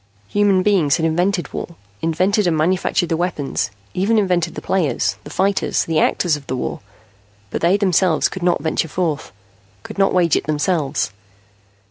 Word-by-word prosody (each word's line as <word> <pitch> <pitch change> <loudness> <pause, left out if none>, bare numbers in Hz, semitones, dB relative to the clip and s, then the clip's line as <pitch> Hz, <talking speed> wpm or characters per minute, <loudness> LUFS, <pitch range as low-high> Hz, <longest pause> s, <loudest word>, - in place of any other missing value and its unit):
Human 200 -2 +3
beings 180 -9 +3
had 160 - 0
invented 175 +3 0
war, 170 - -5 0.3
invented 185 +5 +1
and 165 -2 +1
manufactured 175 +2 +1
the 165 - +1
weapons, 160 -5 -2 0.2
even 205 +5 +1
invented 180 -5 +1
the - - -4
players, 180 -7 0
the - - -8
fighters, 195 +6 0
the 160 -1 +1
actors 170 -4 +2
of 145 -2 -10
the 130 - -2
war. - - -3 0.7
But - - -3
they 175 +4 +4
themselves 185 -5 +2
could 190 - -7
not 175 0 +1
venture 160 +1 0
forth, 160 -2 -2 0.5
could - - -8
not 195 - +4
wage 175 -3 +3
it - - -1
themselves. 150 - 0
175 Hz, 165 wpm, -20 LUFS, 160-190 Hz, 0.7 s, they